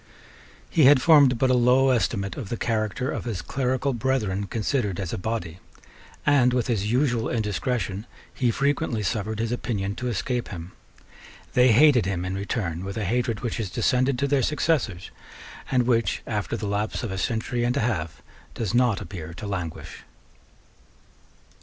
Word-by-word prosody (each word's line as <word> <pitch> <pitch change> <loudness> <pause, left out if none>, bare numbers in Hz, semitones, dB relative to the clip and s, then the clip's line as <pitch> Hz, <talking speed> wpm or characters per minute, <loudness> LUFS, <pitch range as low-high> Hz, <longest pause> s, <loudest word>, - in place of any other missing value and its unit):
He 160 -5 +3
had 140 0 +7
formed 140 -3 +6
but 130 +2 +2
a - - +4
low 125 +2 +4
estimate 105 -5 0
of 115 -8 -6
the 120 - -3
character 110 +2 -1
of - - -4
his 110 -8 -4
clerical 130 +1 -1
brethren 110 -5 -1
considered 105 -3 -1
as 95 -4 -4
a - - -2
body; 90 -5 -4 0.7
and, 130 -4 +4
with 125 -2 +1
his 105 -3 -1
usual 125 -3 +1
indiscretion, 105 -1 -2 0.3
he 125 -3 +1
frequently 135 -2 0
suffered 110 +1 -2
his 115 +1 -2
opinion 100 -5 -2
to 125 - -3
escape 120 +2 -2
him. 85 -2 -8 0.8
They 125 0 +5
hated 125 -3 +5
him 90 -2 -2
in 90 - -3
return 95 -3 -3
with 100 +3 -5
a 110 - -2
hatred 115 +1 -1
which 120 - -3
has 110 -4 -3
descended 130 +7 +1
to 140 +3 0
their 140 -1 +2
successors, 125 - 0 0.6
and 125 -2 +3
which, 115 -2 +1
after 105 +1 -2
the 110 - -5
lapse 105 +4 -2
of 115 - -3
a 95 - -4
century 120 +2 -1
and 125 +3 0
a - - +1
half, 95 -9 -2 0.3
does 110 -3 -2
not 120 -4 +2
appear 85 -4 -8
to 90 - -7
languish. 90 -5 -5
115 Hz, 170 wpm, -25 LUFS, 100-125 Hz, 0.8 s, had